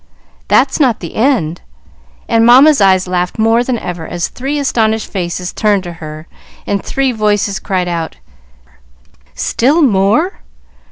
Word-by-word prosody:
"That's 270 +3 +2
not 255 -7 +2
the 170 - -8
end;" 220 - 0 0.7
and 230 0 +2
Mamma's 260 +3 +6
eyes 190 -1 +3
laughed 180 0 -2
more 225 +2 +2
than 245 -1 -2
ever 175 -6 -6
as 175 -1 -3
three 275 +4 -4
astonished 225 -6 0
faces 180 -1 -4
turned 205 -3 +1
to 175 -1 -7
her, 155 0 -8 0.4
and 200 -1 -2
three 270 -1 -1
voices 210 -3 0
cried 185 -2 -2
out, 165 -2 -4 1.2
"Still 290 +8 +1
more?" 225 - +1
210 Hz, 135 wpm, -14 LUFS, 180-250 Hz, 1.2 s, Mamma's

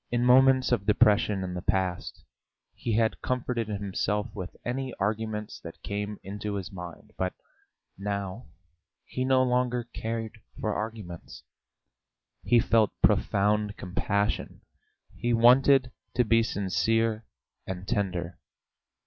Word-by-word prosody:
In 120 0 +1
moments 130 +1 +5
of 100 -4 +1
depression 105 -2 +4
in 90 -1 -4
the 90 - -4
past 90 -1 -1 0.5
he 115 - -3
had 110 0 +1
comforted 125 -3 -1
himself 105 +1 -2
with 95 -4 -7
any 130 +1 -3
arguments 105 +1 -2
that 85 - -11
came 105 0 -3
into 105 +1 -4
his 95 -3 -5
mind, 90 -3 -9
but 95 0 0 0.7
now 100 +2 -4 0.6
he 130 - -3
no 130 0 +4
longer 125 -1 +1
cared 115 0 -4 0.2
for 110 - -1
arguments; 105 -6 -6 1.0
he 120 - +4
felt 110 -2 +3
profound 105 +1 +2
compassion, 100 +3 -1 0.5
he 120 0 0
wanted 125 +2 +5 0.2
to 125 - +3
be 115 +1 +4
sincere 115 +2 0 0.4
and 95 0 -5
tender.... 90 -3 -2
105 Hz, 120 wpm, -28 LUFS, 100-120 Hz, 1.0 s, moments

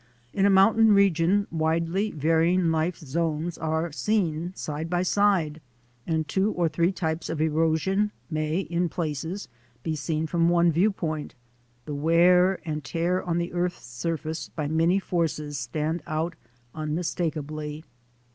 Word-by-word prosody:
In 195 0 +3
a - - +4
mountain 210 +3 +5
region 200 0 +3
widely 165 +5 0
varying 165 +2 +2
life 160 +2 0
zones 160 +2 -2
are 160 +1 -1
seen 175 -2 0
side 155 0 -4
by 175 +1 +1
side; 185 -6 +2 0.5
and 160 -2 0
two 190 +7 +1
or 175 -1 +1
three 170 +3 +1
types 160 -3 -3
of 160 -1 -3
ero 160 +1 +2
sion 195 +6 0 0.2
may, 155 +2 -1
in 175 -1 -1
places, 165 +4 -4 0.4
be 160 - -1
seen 155 +2 -2
from 165 +1 +2
one 175 0 +4
viewpoint 165 -4 -1 0.2
— 120 0 -38
the 150 - -5
wear 175 +5 +4
and 150 -1 -3
tear 170 +6 0
on 170 -1 -1
the 170 0 -2
earth's 175 0 -2
surface 155 +6 -4
by 150 -3 -4
many 165 +4 +2
forces 155 -6 -2
stands 155 +6 -2
out 160 +3 -1 0.4
unmistakably. 155 -1 -3
165 Hz, 145 wpm, -26 LUFS, 155-180 Hz, 0.5 s, mountain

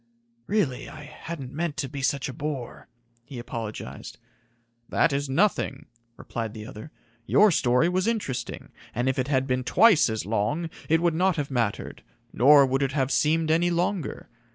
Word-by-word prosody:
"Really, 190 -12 -1
I 150 - -10
hadn't 150 -2 -8
meant 160 0 -3
to 145 -3 -2
be 140 +1 -6
such 140 +2 0
a 135 - -6
bore," 140 -3 -5 0.4
he 130 +1 -10
apologized. 115 -2 -7 0.7
"That 160 - +2
is 140 0 -1
nothing," 185 +10 +1 0.3
replied 115 -1 -5
the 110 -1 -7
other. 110 +7 -9 0.4
"Your 210 -1 +5
story 125 0 +3
was 185 +3 0
interesting, 140 - -3 0.2
and 120 +3 0
if 130 0 0
it 130 - 0
had 135 -2 +1
been 130 -1 -1
twice 190 - +5
as 110 -1 -3
long, 115 - -1 0.2
it 165 +2 +3
would 170 -2 +3
not 180 +2 +2
have 145 -2 -3
mattered, 115 -5 -2 0.3
nor 140 +4 +7
would 135 +1 0
it 135 -1 0
have 135 -2 0
seemed 155 +1 +2
any 170 +2 +3
longer. 175 -1 -2
140 Hz, 170 wpm, -26 LUFS, 125-165 Hz, 0.7 s, nor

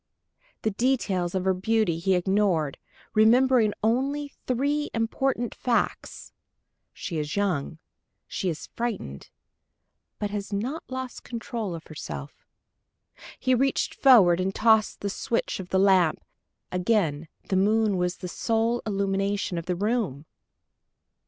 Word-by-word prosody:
The 220 - +1
details 200 -6 0
of 185 0 -1
her 190 - +3
beauty 195 -3 +1
he 190 +2 +2
ignored, 180 -5 +1 0.3
remembering 230 +1 +5
only 275 +5 0
three 285 +4 0
important 240 +1 -1
facts: 245 -2 -2 0.6
"She 165 -4 -5
is 150 0 -3
young, 180 -7 -1 0.5
she 185 - -2
is 160 -2 -5
frightened 215 - -4 0.9
but 205 -1 -3
has 205 0 -4
not 245 +11 -2
lost 260 -1 -5
control 230 -5 -4
of 165 - -9
herself." 70 - -8 0.9
He 255 - +1
reached 270 +2 +1
forward 200 -11 +6
and 190 +1 -1
touched 220 -1 +3
the 200 - -2
switch 230 +1 -2
of 185 -1 -7
the 190 - +1
lamp. 190 -4 +4 0.5
Again 180 -5 0 0.2
the 190 - +1
moon 210 +2 +3
was 180 +1 -1
the 180 - -6
sole 230 +5 0
illumination 195 -2 -1
of 165 - -9
the 180 - 0
room! 200 - -1
205 Hz, 125 wpm, -26 LUFS, 180-235 Hz, 0.9 s, forward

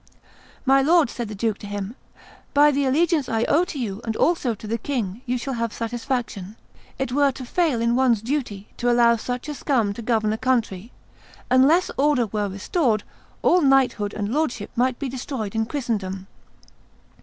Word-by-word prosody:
"My 270 +1 +5
lord," 315 -2 +4
said 240 -2 -4
the 210 - -7
duke 220 +1 -1
to 205 - -8
him, 205 +2 -5 0.6
"by 295 +1 +6
the 280 0 0
allegiance 305 +1 +2
I 225 0 +1
owe 320 +8 +3
to 315 - -7
you 220 -5 -4
and 225 -1 -3
also 280 -8 +1
to 215 - -12
the 230 +2 -2
king 230 -5 -3
you 250 +1 0
shall 265 +2 -4
have 230 -2 -2
satisfaction. 230 -4 -4 0.4
It 265 -2 -2
were 280 +1 +3
to 255 - -8
fail 310 -3 +1
in 235 +1 +2
one's 245 -4 +2
duty 235 -6 -3
to 245 - 0
allow 235 -1 +5
such 245 +4 -4
a 300 - -3
scum 240 -8 0
to 235 - -8
govern 220 -2 +1
a 220 - -4
country. 230 -4 -1 0.6
Unless 285 +8 +4
order 280 -3 +3
were 210 -1 -2
restored, 215 - 0 0.4
all 360 - +4
knighthood 265 -7 +2
and 205 +2 -2
lordship 270 -9 -1
might 250 +1 +1
be 280 - -3
destroyed 250 -4 -5
in 225 0 -1
Christendom." 205 -9 -3
240 Hz, 180 wpm, -23 LUFS, 215-270 Hz, 0.6 s, by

